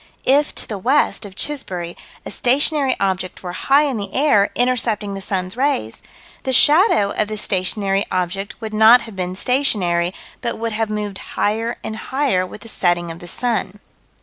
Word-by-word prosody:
If, 285 +3 +3
to - - -4
the 210 -3 -5
west 255 -1 +1
of 190 - -15
Chisbury, 185 -13 -4 0.3
a - - -6
stationary 275 +1 +2
object 190 -2 -2
were 180 -1 -5
high 275 +9 +3
in 275 -5 -1
the 200 -2 -5
air, 255 -8 +3
intercepting 230 -5 0
the 195 - -6
sun's 185 -1 -3
rays, 250 - -1 0.4
the 260 - -2
shadow 290 - +4
of 215 - 0
the 215 0 -5
stationary 195 0 0
object 185 +3 -3
would 220 -1 -5
not 220 +3 +7
have 225 -3 -10
been 180 -1 -3
stationary, 190 -8 +1 0.3
but - - -3
would 230 0 -3
have 220 0 -1
moved 210 -2 -4 0.2
higher 225 +3 0
and 220 - -4
higher 255 -6 0
with 210 - -11
the - - -11
setting 175 -5 +1
of 165 - -9
the 175 - -10
sun. 210 -1 -1
210 Hz, 175 wpm, -20 LUFS, 185-250 Hz, 0.4 s, not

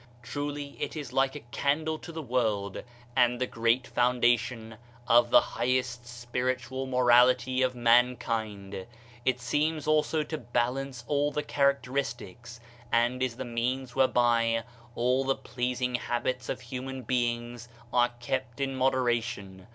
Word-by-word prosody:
Truly 145 +2 -4
it - - -3
is 140 -5 -6
like 135 +1 +2
a 150 - -6
candle 155 +2 0
to 170 - -9
the 160 -1 -6
world, 110 -6 -1 0.3
and 125 -1 +3
the 130 - +1
great 115 +1 +1
foundation 120 -2 +1 0.3
of 120 0 +5
the - - +8
highest 125 -1 -1
spiritual 125 +2 -3
morality 125 0 +4
of 130 -1 +1
mankind! 115 -5 +1 0.4
It 130 -1 +2
seems 150 +4 0
also 155 0 +2
to 155 0 -5
balance 125 +1 -2
all 145 0 +1
characteristics 130 -6 -1 0.3
and 120 +2 +2
is 130 -3 0
the - - -5
means 125 +2 -2
where 135 -1 +5
by 115 -2 +2 0.3
all 125 +3 +2
the 135 0 +1
pleasing 125 0 -2
habits 125 +1 -2
of - - -3
human 130 +1 -6
beings 120 0 -2 0.2
are 120 0 +4
kept 125 0 -3
in 135 -1 -1
moderation. 120 -7 -1
125 Hz, 135 wpm, -28 LUFS, 120-130 Hz, 0.4 s, the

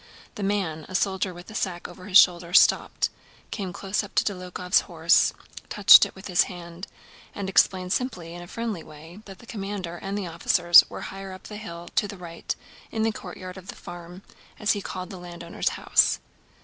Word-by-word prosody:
The - - -8
man, 195 -6 -2
a 185 - -6
soldier 190 0 0
with 175 +4 -11
a - - -10
sack 180 -5 -3
over 180 +1 -12
his 190 -1 +6
shoulder, 175 -2 +5
stopped, - - +4 0.4
came 195 -4 -4
close 195 +3 -2
up 205 - -11
to - - +4
Dólokhov's 180 -1 0
horse, - - +4 0.4
touched - - +8
it - - -16
with 190 - -12
his 180 -2 +3
hand, 175 0 -9 0.5
and 200 -1 -4
explained 185 -1 +2
simply 220 -10 -3
and 170 - -8
in - - -9
a 175 - -10
friendly 225 -4 -4
way 160 +5 -13
that 195 -2 -11
the 235 - -16
commander 195 -5 -5
and 195 +3 -4
the 200 - -3
officers 175 +1 +6
were - - -7
higher 195 0 -7
up 185 - -11
the 210 - -8
hill 175 -6 -8
to 205 - +3
the 200 - -9
right 170 -2 -6 0.3
in 220 - -2
the 225 - +2
courtyard 185 -2 -9
of 190 0 -12
the - - -7
farm, 175 +2 -10 0.3
as 210 - +1
he 205 - -1
called 185 -1 -6
the 190 - -8
landowner's 175 -1 -3
house. - - +3
185 Hz, 200 wpm, -25 LUFS, 175-200 Hz, 0.5 s, touched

